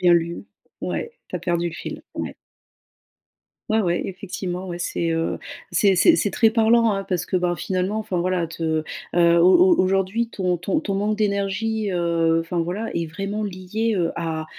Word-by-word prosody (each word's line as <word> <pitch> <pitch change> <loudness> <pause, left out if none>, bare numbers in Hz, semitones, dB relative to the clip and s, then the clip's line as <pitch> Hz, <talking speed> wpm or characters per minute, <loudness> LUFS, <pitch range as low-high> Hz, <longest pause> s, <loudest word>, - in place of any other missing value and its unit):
Rien 175 -1 +6
lu, 170 +2 -1 0.4
ouais, 470 0 -4
tu 180 - -3
as - - -4
perdu 170 0 0
le 160 - -8
fil, - - -7
ouais. - - -4 1.3
Ouais, 220 +1 +3
ouais, 175 -2 +1
effectivement, 185 -1 -5
ouais, 175 - -4
c'est, 170 -1 -2
heu, 165 0 -1 0.3
c'est 195 -2 +4
c'est 330 - +6
c'est 205 - +1
très 225 +1 +3
parlant, 230 0 +4
hein, 195 0 -1
parce 180 -3 -2
que, - - -2
ben, 175 -1 +1
finalement, 185 +5 -1
enfin 195 -5 -2
voilà, 180 -1 0
te, 160 -1 -2 0.3
heu, 170 -1 +5
au 265 - +6
au - - +6
aujourd'hui 195 +5 +1
ton 180 -4 -1
ton 180 +3 0
ton 200 - -3
manque 210 +2 0
d'énergie, 210 +1 0
heu, 165 -2 +2
enfin 170 +1 -3
voilà, 180 +7 -3
est 170 -1 -1
vraiment 195 +6 -4
lié, 205 +4 -2
heu, 170 -1 +1
à 160 -1 -3
185 Hz, 185 wpm, -23 LUFS, 170-210 Hz, 1.3 s, Rien